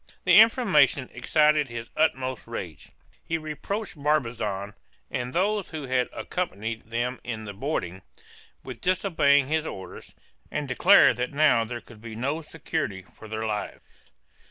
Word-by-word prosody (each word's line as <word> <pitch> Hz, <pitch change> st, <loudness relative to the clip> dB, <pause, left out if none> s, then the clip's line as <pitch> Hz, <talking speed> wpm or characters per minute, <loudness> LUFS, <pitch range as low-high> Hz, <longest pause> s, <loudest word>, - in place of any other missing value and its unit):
The 180 Hz, +2 st, +7 dB
information 185 Hz, -, +3 dB
excited 150 Hz, +3 st, +3 dB
his 115 Hz, -1 st, -7 dB
utmost 130 Hz, -6 st, 0 dB
rage. 90 Hz, -, -7 dB, 0.3 s
He 165 Hz, -, -1 dB
reproached 170 Hz, +7 st, -5 dB
Barbazan, 115 Hz, -9 st, -1 dB, 0.4 s
and 125 Hz, 0 st, -3 dB
those 200 Hz, +5 st, 0 dB
who 155 Hz, -2 st, -6 dB
had 130 Hz, -1 st, 0 dB
accompanied 115 Hz, -, -4 dB
them 120 Hz, +3 st, -2 dB
in 110 Hz, -2 st, -5 dB
the 100 Hz, -1 st, -7 dB
boarding, 100 Hz, -, -3 dB, 0.6 s
with 125 Hz, -3 st, -9 dB
disobeying 165 Hz, -7 st, +3 dB
his 160 Hz, +1 st, 0 dB
orders, 95 Hz, -, -9 dB, 0.3 s
and 150 Hz, -1 st, -3 dB
declared 130 Hz, -2 st, +6 dB
that 125 Hz, +3 st, -2 dB
now 140 Hz, -6 st, +4 dB
there 120 Hz, +1 st, -6 dB
could 110 Hz, -1 st, -16 dB
be 115 Hz, -1 st, -8 dB
no 140 Hz, +8 st, -2 dB
security 155 Hz, -, -4 dB
for 110 Hz, -, -12 dB
their 110 Hz, +1 st, -4 dB
lives. 105 Hz, -1 st, -4 dB
130 Hz, 140 wpm, -26 LUFS, 115-155 Hz, 0.6 s, The